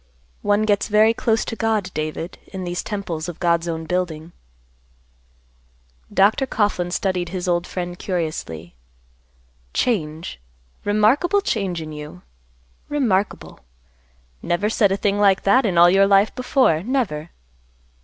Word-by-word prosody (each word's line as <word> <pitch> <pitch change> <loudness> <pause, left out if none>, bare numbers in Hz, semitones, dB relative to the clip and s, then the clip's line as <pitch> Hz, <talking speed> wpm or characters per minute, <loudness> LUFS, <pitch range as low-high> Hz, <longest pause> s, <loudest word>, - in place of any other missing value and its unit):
One 205 +1 +2
gets 205 -1 +1
very 215 +1 +4
close 225 -1 0
to - - -4
God, 220 -4 -1
David, 155 +3 -4
in 190 -1 -7
these 175 0 -3
temples 180 -6 -4
of 175 - -8
God's 170 -1 +1
own 165 -1 -3
building." 170 -2 -3 1.8
Dr. 220 +7 +3
Coughlan 205 -6 0
studied 180 -1 -1
his 185 0 -4
old 175 0 0
friend 175 -1 -5
curiously; 155 - -4 1.0
"Change; 160 - -1 0.4
remarkable 245 - +3
change 195 - -2
in 155 - -8
you! 150 -11 -9 0.7
Remarkable! 225 -9 -1 0.8
Never 205 +5 0
said 205 -3 +3
a 195 - +1
thing 200 0 0
like 195 -2 +4
that 240 +5 +4
in 180 -3 -1
all 170 +1 +8
your 195 +1 +5
life 200 +1 +4
before, 255 - +2
never." 195 - -2
190 Hz, 130 wpm, -21 LUFS, 170-210 Hz, 1.8 s, all